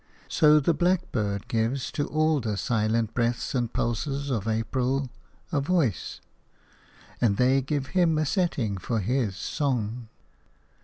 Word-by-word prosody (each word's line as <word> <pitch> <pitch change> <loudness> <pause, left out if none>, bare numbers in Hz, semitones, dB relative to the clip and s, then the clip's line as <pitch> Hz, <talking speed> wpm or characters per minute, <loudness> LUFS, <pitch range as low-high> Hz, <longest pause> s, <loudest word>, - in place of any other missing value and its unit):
So 150 -1 +5
the 155 +3 +2
blackbird 125 - 0
gives 120 +3 -1
to 145 - -2
all 155 0 +2
the 110 -5 -2
silent 110 +2 0
breaths 120 -1 -1
and 120 -3 -1
pulses 140 +4 -2
of 110 -4 -1
April 125 +4 -1 0.4
a 145 -4 +1
voice, 145 - 0 1.0
and 105 -5 +3
they 130 +2 +4
give 135 +1 -2
him 175 -4 +3
a 155 - +1
setting 135 - 0
for 115 +5 -1
his 110 -1 0
song. 120 0 -2
125 Hz, 135 wpm, -26 LUFS, 110-145 Hz, 1.0 s, So